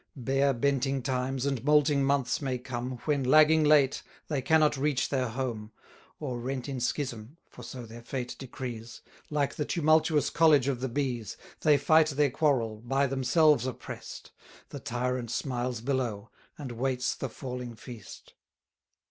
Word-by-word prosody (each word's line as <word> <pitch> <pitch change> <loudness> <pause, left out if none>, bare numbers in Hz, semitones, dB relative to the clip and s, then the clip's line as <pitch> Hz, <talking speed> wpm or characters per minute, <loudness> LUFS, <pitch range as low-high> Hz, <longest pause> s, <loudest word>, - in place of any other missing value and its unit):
Bare 135 +1 +1
benting 135 +1 0
times, 130 0 -1
and 135 -4 -1
moulting 150 -1 +3
months 135 -2 +1
may 130 -3 -1
come, 125 0 -5
When, 145 -3 +1
lagging 155 +4 +5
late, 145 -3 +4 0.3
they 145 -4 -1
cannot 155 +2 +3
reach 140 -1 0
their 130 -2 0
home; 115 -3 -4 0.5
Or, 130 -5 -4
rent 130 +1 -4
in 135 -2 -4
schism 120 +1 -3
(for - - -14
so 125 -2 -8
their 115 +1 -11
fate 125 +1 -5
decrees), 120 -3 -7 0.3
Like 145 -2 0
the 150 - -2
tumultuous 155 -1 +2
college 150 -5 +4
of 135 -3 -1
the 130 +1 -2
bees, 120 -5 -3 0.2
They 150 -2 +4
fight 160 +1 +4
their 145 -1 +1
quarrel, 125 -7 +1
by 135 +5 0
themselves 135 +1 +3
oppress'd; 130 - -8 0.4
The - - -7
tyrant 125 0 -2
smiles 120 -1 -2
below, 120 -5 -2 0.3
and 140 -5 -6
waits 125 +1 -1
the 135 - -5
falling 125 -1 -6
feast. 115 -3 -11
130 Hz, 150 wpm, -29 LUFS, 120-145 Hz, 0.5 s, lagging